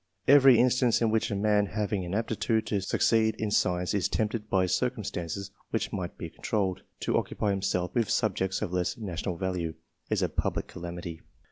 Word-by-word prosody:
Every 135 Hz, -3 st, +8 dB
in 125 Hz, +2 st, +5 dB
stance 125 Hz, -2 st, +3 dB
in 115 Hz, -2 st, +2 dB
which 110 Hz, 0 st, +1 dB
a 100 Hz, -, -1 dB
man 105 Hz, 0 st, +2 dB
having 105 Hz, -1 st, -2 dB
an 90 Hz, +2 st, -3 dB
aptitude 110 Hz, 0 st, 0 dB
to 105 Hz, -3 st, -1 dB
succeed 110 Hz, +2 st, +2 dB
in 110 Hz, -1 st, -2 dB
science,^ 90 Hz, -3 st, +1 dB
is 100 Hz, -3 st, +1 dB
tempted 110 Hz, 0 st, -2 dB
by 95 Hz, -1 st, +3 dB
circumstances 100 Hz, -2 st, -2 dB, 0.2 s
which 115 Hz, -, -2 dB
might 90 Hz, -4 st, -4 dB
be 85 Hz, -, -6 dB
controlled, 95 Hz, -4 st, -1 dB, 0.2 s
to -, -, 0 dB
occupy 105 Hz, -, -2 dB
himself 95 Hz, -2 st, -1 dB
with 115 Hz, -3 st, +1 dB
subjects 95 Hz, -3 st, 0 dB
of 90 Hz, -, -4 dB
less 90 Hz, -1 st, 0 dB
national 90 Hz, -4 st, -4 dB
value, 90 Hz, -3 st, -2 dB, 0.3 s
is -, -, +1 dB
a -, -, +3 dB
public -, -, -1 dB
calamity. 85 Hz, -1 st, -7 dB
100 Hz, 180 wpm, -28 LUFS, 90-110 Hz, 0.3 s, Every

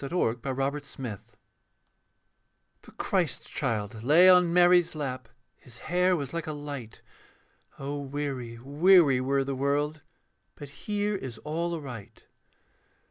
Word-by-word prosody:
A 140 Hz, -, -4 dB
CHRISTMAS 135 Hz, -2 st, -1 dB, 0.2 s
CAROL 115 Hz, -7 st, -5 dB, 1.6 s
The -, -, -16 dB
Christ -, -, -1 dB
child 110 Hz, 0 st, -3 dB
lay 155 Hz, +9 st, +6 dB
on 180 Hz, -2 st, +6 dB
Mary's 175 Hz, -1 st, +4 dB
lap, 130 Hz, -5 st, -5 dB, 0.3 s
His 120 Hz, -2 st, -14 dB
hair 180 Hz, +6 st, +1 dB
was 140 Hz, -4 st, -5 dB
like 170 Hz, -1 st, -4 dB
a 155 Hz, -, -3 dB
light. 145 Hz, -6 st, -8 dB, 0.8 s
(O 140 Hz, +1 st, -4 dB
weary, 135 Hz, -4 st, -5 dB
weary 145 Hz, +1 st, +4 dB
were 135 Hz, +1 st, +1 dB
the 135 Hz, 0 st, -3 dB
world, 145 Hz, +3 st, -1 dB, 0.5 s
But 145 Hz, -2 st, -10 dB, 0.2 s
here 205 Hz, 0 st, 0 dB
is 130 Hz, -, -6 dB
all 170 Hz, +3 st, -2 dB
aright.) 125 Hz, -10 st, -9 dB
145 Hz, 125 wpm, -27 LUFS, 130-170 Hz, 1.6 s, lay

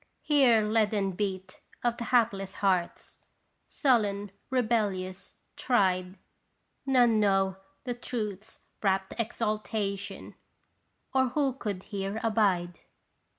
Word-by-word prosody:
Hear 260 Hz, -7 st, +4 dB
leaden 210 Hz, -2 st, +1 dB
beat 190 Hz, -1 st, -4 dB, 0.2 s
of 240 Hz, -1 st, +1 dB
the 235 Hz, -, -4 dB
hapless 205 Hz, -6 st, +1 dB
hearts, 185 Hz, -3 st, -1 dB, 0.5 s
sullen, 205 Hz, -7 st, +1 dB, 0.2 s
rebellious, 210 Hz, -7 st, -1 dB, 0.2 s
tried. 185 Hz, -6 st, +1 dB, 0.7 s
None 245 Hz, -4 st, +4 dB
know 195 Hz, -2 st, +2 dB, 0.3 s
the 245 Hz, -, -2 dB
Truth's 215 Hz, -4 st, -5 dB, 0.2 s
rapt 190 Hz, -1 st, 0 dB
exaltation, 215 Hz, -3 st, -3 dB, 0.8 s
or 260 Hz, -1 st, +3 dB
who 275 Hz, 0 st, +1 dB
could 205 Hz, -7 st, -5 dB
here 200 Hz, 0 st, -4 dB
abide? 195 Hz, -6 st, +1 dB
210 Hz, 95 wpm, -29 LUFS, 195-235 Hz, 0.8 s, Hear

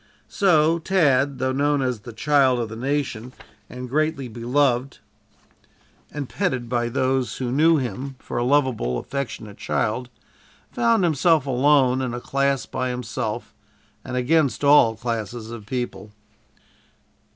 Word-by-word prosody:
So 165 Hz, -4 st, +3 dB
Tad, 140 Hz, -7 st, +2 dB
though 130 Hz, 0 st, 0 dB
known 145 Hz, +1 st, +1 dB
as 125 Hz, -3 st, -1 dB
"the 120 Hz, +3 st, -10 dB
child 130 Hz, +1 st, +2 dB
of 115 Hz, -2 st, -3 dB
the 110 Hz, -, -7 dB
nation," 130 Hz, -2 st, -3 dB, 0.4 s
and 125 Hz, 0 st, -7 dB
greatly 150 Hz, 0 st, -1 dB
beloved 125 Hz, +2 st, 0 dB, 1.1 s
and 145 Hz, -3 st, -5 dB
petted 130 Hz, -11 st, -2 dB
by 120 Hz, 0 st, -1 dB
those 130 Hz, 0 st, 0 dB
who 125 Hz, -2 st, -3 dB
knew 160 Hz, +4 st, +4 dB
him 130 Hz, +1 st, -4 dB
for 120 Hz, -, -5 dB
a -, -, 0 dB
lovable 125 Hz, -, +1 dB
affectionate 115 Hz, -, -5 dB
child, 120 Hz, +3 st, -1 dB, 0.6 s
found 230 Hz, -4 st, +2 dB
himself 160 Hz, -2 st, +3 dB
alone 130 Hz, -1 st, +3 dB
in 125 Hz, -2 st, -3 dB
a -, -, -4 dB
class 140 Hz, +1 st, 0 dB
by 130 Hz, 0 st, -3 dB
himself, 125 Hz, -3 st, -4 dB, 0.5 s
and 125 Hz, -, -4 dB
against 145 Hz, +2 st, +1 dB
all 140 Hz, -6 st, +6 dB
classes 115 Hz, 0 st, -4 dB
of 110 Hz, -3 st, -9 dB
people. 120 Hz, -3 st, -4 dB
130 Hz, 135 wpm, -23 LUFS, 120-145 Hz, 1.1 s, all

